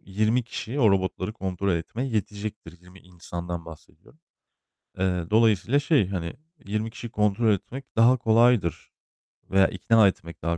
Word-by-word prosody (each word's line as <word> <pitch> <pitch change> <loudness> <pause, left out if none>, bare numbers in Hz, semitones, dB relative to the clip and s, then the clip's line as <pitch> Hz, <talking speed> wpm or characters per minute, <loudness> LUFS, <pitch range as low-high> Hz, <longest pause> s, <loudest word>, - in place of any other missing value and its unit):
20 110 +5 0
kişi 120 +3 -5
o 110 -4 +5
robotları 95 +1 -1
kontrol 95 -2 -2
etmeye 115 +10 -3
yetecektir. 105 -5 -5
20 90 +1 -17
insandan 85 -1 -7
bahsediyorum. 80 - -15 0.8
Eee, 90 -2 0
dolayısıyla 115 +5 +3
şey, 145 - +2
hani, 85 -4 -4 0.3
20 110 +2 -2
kişiyi 120 +1 -8
kontrol 105 +1 +2
etmek 125 +7 -6
daha 120 +3 +5
kolaydır 115 -6 +2 0.6
veya 95 0 +5
ikna 110 +3 +3
etmek 85 -3 -5
daha 85 +1 -1
100 Hz, 135 wpm, -25 LUFS, 90-115 Hz, 0.8 s, o